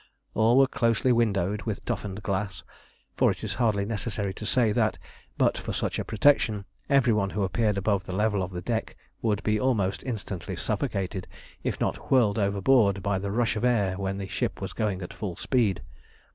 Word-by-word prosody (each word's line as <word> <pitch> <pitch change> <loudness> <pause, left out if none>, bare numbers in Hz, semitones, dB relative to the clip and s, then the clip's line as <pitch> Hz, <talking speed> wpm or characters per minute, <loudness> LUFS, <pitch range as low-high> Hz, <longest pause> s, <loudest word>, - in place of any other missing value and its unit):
All 115 +3 +4
were 135 - +7
closely 115 -1 +1
windowed 105 -4 +1
with 110 -2 -4
toughened 105 -3 -4
glass, 95 0 -2 0.5
for - - +4
it - - -3
is - - -2
hardly 110 -5 +1
necessary 105 -2 -2
to 105 - -6
say 120 -3 +3
that, 110 -1 +1 0.4
but - - +2
for - - -4
such - - -1
a - - -1
protection, 110 -3 +2 0.2
every 135 -5 +4
one 100 -2 +1
who 100 +1 -1
appeared 105 +2 +1
above 100 -1 0
the - - -6
level 105 +1 +1
of 90 - -2
the 90 -2 -6
deck 115 +2 -2 0.3
would 105 -3 0
be 105 0 +1
almost 105 -6 +1
instantly 100 -8 -4
suffocated, 95 -1 -2 0.3
if - - -2
not - - -2
whirled 115 -5 +4
overboard, 100 0 +3
by 100 -2 0
the 100 +1 -3
rush 110 +1 +1
of 105 - -3
air 105 -7 +2
when 95 0 -3
the 100 -1 -4
ship 95 - -2
was - - -5
going 100 -4 -1
at 90 - -7
full 95 -5 -5
speed. 115 -6 0
105 Hz, 190 wpm, -27 LUFS, 95-115 Hz, 0.5 s, were